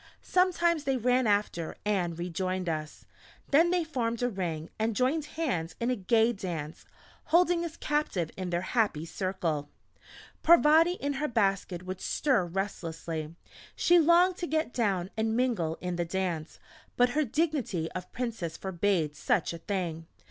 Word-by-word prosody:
Sometimes 345 -4 +2
they 270 -1 +1
ran 250 +1 +2
after, 205 -5 0
and 180 -5 0
rejoined 185 +1 -2
us. 155 -2 -4 0.5
Then 325 +5 +5
they 355 -1 +2
formed 245 -7 -2
a 245 - +2
ring 170 -6 -4
and 220 0 0
joined 275 +6 +1
hands 180 - -1
in 235 +2 0
a - - +1
gay 225 +3 +2
dance, 165 -7 -6 0.4
holding 345 +1 +3
us 335 -1 -6
captive 295 - -1
in 185 -1 -4
their 175 0 0
happy 200 -8 0
circle. 165 -5 -2 0.7
Parvati 330 +1 +6
in 285 -5 -3
her 300 - +1
basket 195 - 0
would 185 0 -5
stir 250 -12 +1
restlessly: 165 -4 -4 0.4
she 350 0 +5
longed 345 +3 +5
to 345 - -3
get 315 -5 -1
down 195 -6 0
and 220 +1 0
mingle 215 -11 0
in 180 -1 -3
the 175 - +1
dance, 170 -3 -3 0.4
but 245 0 +5
her 305 +5 +1
dignity 275 - -1
of 180 -1 -7
Princess 225 -10 -4
forbade 175 -5 0
such 150 - 0
a 170 - -7
thing. 165 -3 -3
205 Hz, 155 wpm, -29 LUFS, 175-285 Hz, 0.7 s, Parvati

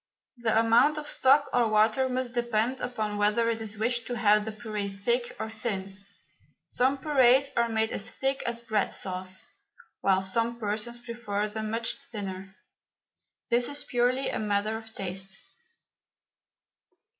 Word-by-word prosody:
The 225 -2 +2
amount 230 +7 +4
of 300 - -4
stock 280 0 +4
or 245 -2 +3
water 220 +4 +3
must 255 -1 -2
depend 240 +1 0
upon 215 -4 -3
whether 215 +3 +2
it 225 0 -3
is 220 -1 -4
wished 235 +2 0
to 245 - -3
have 210 -2 +4
the 220 - -3
puree 215 -2 -4
thick 235 +5 -1
or 220 - -4
thin. 200 -3 -5 0.6
Some 260 +3 +1
purees 270 -1 +4
are 235 0 +2
made 220 0 +1
as 215 - -2
thick 270 0 -1
as 235 0 -2
bread 220 -3 0
sauce, 185 0 -1 0.5
while 190 -1 +2
some 230 +5 0
persons 215 +2 -2
prefer 235 -4 -3
them 215 0 -4
much 230 +1 -1
thinner. 195 -3 -7 1.0
This 240 +1 +3
is 285 0 -4
purely 250 +2 +1
a - - -2
matter 210 +1 0
of 220 0 -8
taste. 195 -1 -3
225 Hz, 150 wpm, -28 LUFS, 210-240 Hz, 1.0 s, amount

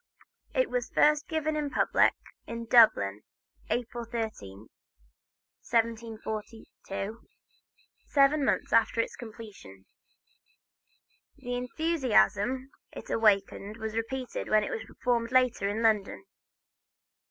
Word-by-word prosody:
It - - +1
was 245 -1 -2
first 300 0 +3
given 315 -2 -1
to 305 - -1
the 290 - -3
public, - - +3 0.3
in 230 0 -5
Dublin, 105 - +5 0.5
April 240 0 -2
13, 210 - -6 1.0
1742, 225 -2 -3 0.9
seven 285 +1 +3
months - - 0
after 230 0 +3
its 230 - -1
completion. 210 - -11 1.5
The 245 -3 -6
enthusiasm 255 - +1 0.2
it - - -9
awakened 205 -1 +1
was 220 -1 -5
repeated 250 +3 -4
when 215 0 +4
it - - -4
was 220 - -4
performed 235 -2 -1
later 255 -5 +2
in 220 +3 -2
London. 210 -3 +1
230 Hz, 105 wpm, -29 LUFS, 215-255 Hz, 1.5 s, Dublin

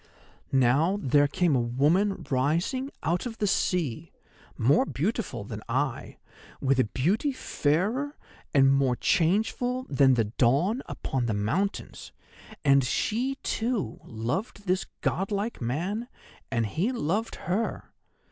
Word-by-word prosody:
Now 135 +9 +3
there 145 -2 +3
came 165 0 +1
a 125 - +3
woman 160 +10 +1
rising 165 - 0
out 175 +9 0
of 225 -2 -7
the 210 - 0
sea, 170 - 0 0.5
more 140 - +4
beautiful 210 - -2
than 105 +1 -7
I, 135 +1 -2 0.4
with 135 -1 +2
a 130 - +4
beauty 180 - 0
fairer 230 - -1 0.3
and 135 -1 +5
more 135 -2 +2
changeful 220 - +1
than 135 -2 +5
the 115 - +3
dawn 140 - +2
upon 125 -3 -2
the 110 - 0
mountains; 160 - -2 0.5
and 140 -1 +5
she, 240 - 0
too, 225 - -1
loved 165 - -4
this 185 0 0
godlike 200 - -1
man, 180 - -2 0.4
and 115 -1 0
he 170 - -1
loved 220 - -1
her. 200 +6 -3
160 Hz, 125 wpm, -27 LUFS, 130-210 Hz, 0.5 s, and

